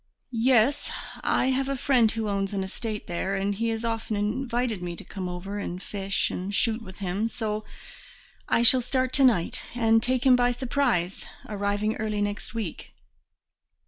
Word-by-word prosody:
"Yes, 245 +2 +3 0.3
I 260 - +2
have 270 +1 0
a 275 - 0
friend 245 -4 +4
who 220 -1 -2
owns 200 -1 -1
an 195 - 0
estate 210 +2 -5
there, 185 +3 -2
and 195 +1 0
he 230 +3 -1
has 225 +1 -2
often 225 -1 -2
invited 235 0 -1
me 175 -1 -4
to - - -8
come 185 -2 -5
over 195 +3 -5
and 180 -3 -4
fish 195 0 -2
and 195 +3 -3
shoot 225 +1 +1
with 190 -4 -11
him, 195 +3 -1
so 215 -2 -3 0.8
I 235 - +3
shall 255 +2 +7
start 255 +1 0
to 275 - +5
night, 220 -10 +3
and 225 -1 +4
take 255 +2 0
him 255 -1 +7
by 245 0 +3
surprise, 240 -8 0 0.2
arriving 205 +1 -1
early 215 -1 -2
next 205 +2 -4
week." 215 -8 -5
220 Hz, 175 wpm, -26 LUFS, 200-245 Hz, 0.8 s, shall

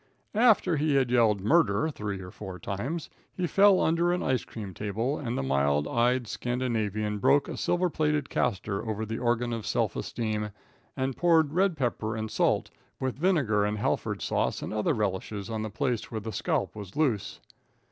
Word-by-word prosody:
After 210 -7 +4
he 150 0 +1
had 130 -3 +2
yelled 110 -5 +3
"Murder!" 115 - +3
three 105 -7 -4
or 90 -1 -9
four 95 -3 -8
times, 130 - -4 0.3
he 185 - -1
fell 195 +2 +5
under 170 +2 +2
an 180 - 0
ice 130 -1 +1
cream 100 -4 -8
table, 110 - -2
and 120 -3 -3
the - - -1
mild 70 +2 +1
eyed 125 +1 +2
Scandinavian 110 -2 -2
broke 140 +8 +4
a - - -5
silver 175 +1 +1
plated 150 -3 0
castor 100 -3 -1
over 110 -1 -3
the 110 +1 -4
organ 120 0 0
of 115 -2 -3
self - - 0
esteem, 105 -2 -2 0.5
and 130 -1 -1
poured 160 -4 +3
red 185 -1 +2
pepper, 115 -4 -1
and 110 -1 -4
salt, - - +1 0.3
and 130 -1 -1
vinegar, 140 - +2
and 105 +1 0
Halford 105 - -1
sauce - - 0
and - - -4
other 105 0 +1
relishes, 100 0 -2
on 110 -1 -2
the 110 - -3
place 120 +1 -2
where 110 - -3
the 110 +1 -6
scalp - - -1
was 100 -3 -9
loose. 130 -10 0
115 Hz, 180 wpm, -28 LUFS, 105-145 Hz, 0.5 s, fell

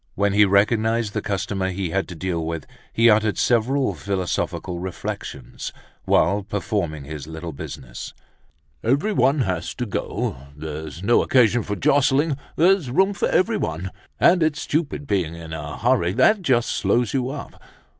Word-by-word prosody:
When 100 0 +1
he 105 0 +6
recognized 110 +2 +2
the - - -1
customer 95 -1 -2
he 95 -2 -3
had 95 +2 0
to 90 - -8
deal 85 -1 -2
with 80 -2 -4 0.3
he 115 +1 +4
uttered 105 -1 +4
several 120 +2 +2
philosophical 90 0 -2
reflections, 90 0 -6 0.4
whilst 100 +1 +2
performing 90 -8 -2
his 75 0 -7
little 80 +1 -6
business. 65 -2 -8 0.7
"Everyone 140 - +2
has 90 -7 -2
to 125 - -3
go. 100 - -3 0.2
There's 80 +1 -6
no 120 +4 +4
occasion 120 -2 +4
for 105 -1 -3
jostling, 140 - +3 0.2
there's 175 -3 +3
room 190 +10 +3
for - - 0
everyone. 95 - 0 0.3
And 175 0 +5
it's 155 -2 +1
stupid 150 -1 -2
being 90 - -1
in 80 -1 -8
a 75 -2 -6
hurry 115 -7 +2
that 165 - +4
just 125 -8 +2
slows 120 -2 +1
you 130 -2 0
up. 140 +1 -8
105 Hz, 150 wpm, -23 LUFS, 85-130 Hz, 0.7 s, he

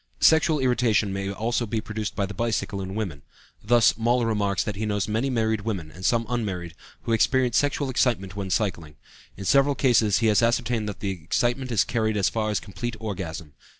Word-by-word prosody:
Sexual 160 -2 +4
irritation 120 -5 +2
may 100 0 -3
also 115 +3 -1
be 110 +2 -1
produced 110 -1 -5
by 100 - 0
the 100 - -7
bicycle 105 -2 -2
in 95 +1 -6
women. 95 -10 -4 0.4
Thus, 120 +2 +4
Moll 120 +1 +2
remarks 100 -4 0
that 105 - -4
he 110 +2 -3
knows 105 -2 -1
many 110 +5 0
married 110 -3 0
women, 95 -8 -4
and 90 +3 -12
some 115 +3 +2
unmarried, 95 -9 -3 0.3
who - - -3
experience 125 +1 +2
sexual 145 0 +1
excitement 115 -7 0
when 100 -1 -4
cycling; 85 -7 -2 0.4
in 100 - -7
several 140 +5 +4
cases 115 -7 +3
he 115 - 0
has 110 0 +4
ascertained 115 -2 0
that 100 - -8
the 100 - -1
excitement 120 - -1
is 115 - +3
carried 110 -2 -1
as 100 - +2
far 110 -1 -1
as 105 - 0
complete 105 +5 -6
orgasm. 90 -8 -5
110 Hz, 195 wpm, -25 LUFS, 100-120 Hz, 0.4 s, Sexual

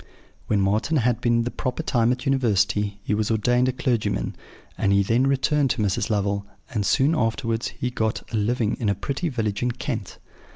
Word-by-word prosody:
"When 105 - +2
Marten 110 +11 +1
had 120 -2 +1
been 120 -1 +2
the 120 - -3
proper 125 +5 -3
time 120 -5 +2
at 125 - +1
the 125 - -10
University, 105 -6 +1
he - - -1
was 105 0 0
ordained 125 +3 +2
a - - +2
clergyman; 125 -3 -1 0.4
and 100 - +1
he 100 0 +4
then 120 +6 +2
returned 140 +1 +2
to 115 - 0
Mrs. 100 +2 0
Lovel, 100 -1 0 0.3
and 105 -5 -1
soon 135 - +3
afterwards 115 -3 0
he 125 - -4
got 110 -2 -1
a - - +1
living 110 +1 +1
in 110 -4 0
a 100 - +1
pretty 140 - -2
village 110 -6 -2
in 125 - +1
Kent. 115 -4 -4
115 Hz, 200 wpm, -24 LUFS, 105-125 Hz, 0.4 s, he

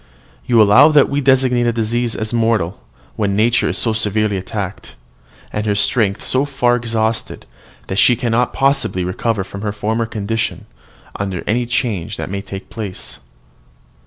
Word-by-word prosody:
"You 120 -2 +4
allow 105 +8 +7
that 150 -3 +4
we 145 +1 0
designate 130 -2 +3
a - - +3
disease 115 +1 -1
as 110 +1 -4
mortal 110 -6 0 0.4
when 100 -2 0
nature 120 +3 +2
is - - -2
so 115 - +1
severely 110 -1 0
attacked, 95 - -5 0.6
and 105 +1 -2
her 105 - +1
strength 100 -1 +1
so 130 +1 +1
far 135 -4 +1
exhausted, 115 -1 -2 0.4
that 95 - -2
she 125 - +5
cannot 120 +1 0
possibly 135 -9 +1
recover 95 +3 -1
her 100 +2 -5
former 110 +2 -2
condition 110 +1 -3 0.5
under 95 -3 -3
any 120 +3 0
change 115 -8 -2
that - - -5
may 100 0 -3
take 100 -1 -9
place. 100 - -7
110 Hz, 155 wpm, -18 LUFS, 100-120 Hz, 0.6 s, allow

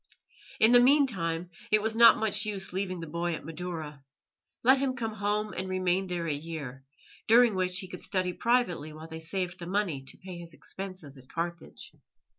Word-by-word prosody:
In 220 - +6
the 245 - +8
meantime 195 - +2 0.2
it 215 - +5
was 220 +1 0
not 235 0 +8
much 210 -1 +1
use 200 -4 -3
leaving 185 -2 -2
the - - -5
boy 170 +2 -2
at - - -9
Madaura. 160 -3 -6 0.6
Let 260 +3 +6
him 265 -1 0
come 225 -3 -3
home 210 0 -1
and 185 +1 -4
remain 185 0 0
there 175 -2 -3
a 155 - 0
year, 145 -4 -6 0.4
during 235 0 +6
which 185 -1 0
he 185 - -3
could 180 -1 -9
study 185 -1 -1
privately 180 -10 0
while 155 +1 -10
they 160 0 -7
saved 180 +2 -3
the 170 - -7
money 185 -7 -1
to - - -9
pay 185 -2 -9
his 170 -2 -10
expenses 185 -8 -7
at 130 - -16
Carthage. 170 0 -5
185 Hz, 190 wpm, -29 LUFS, 165-210 Hz, 0.6 s, the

